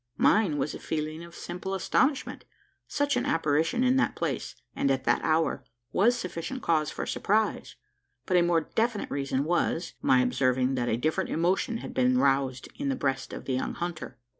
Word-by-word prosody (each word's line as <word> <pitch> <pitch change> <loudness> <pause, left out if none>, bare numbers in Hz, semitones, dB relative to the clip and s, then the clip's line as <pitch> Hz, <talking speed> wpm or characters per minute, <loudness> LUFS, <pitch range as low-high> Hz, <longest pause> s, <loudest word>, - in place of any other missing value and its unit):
Mine 200 -9 +3
was 145 +2 -1
a - - -7
feeling 155 +1 -3
of 170 0 -12
simple 190 +2 -5
astonishment. 265 +8 0 0.4
Such 285 -1 0
an 245 - +1
apparition 165 +8 +1
in 255 +1 +3
that 270 - +1
place, - - -3 0.2
and 140 - +1
at 135 -1 +1
that 120 - +1
hour, 160 +1 +1 0.3
was 235 +6 +3
sufficient 185 +6 -5
cause 155 -2 +2
for - - -4
surprise; 215 +2 0 0.5
but 185 - 0
a 175 - +6
more 170 -1 +3
definite 225 +2 -1
reason 135 -1 -1
was, 170 +1 0
my 130 -1 +4
observing 130 +1 +1
that 120 -2 -1
a 110 - +1
different 155 +6 -1
emotion 185 +8 0
had - - -7
been 125 0 +3
roused 135 -1 +1
in 285 -1 -2
the 270 - 0
breast 135 - -2
of - - -7
the 130 - -2
young 130 - -2
hunter. 175 -2 -5
160 Hz, 185 wpm, -28 LUFS, 135-200 Hz, 0.5 s, a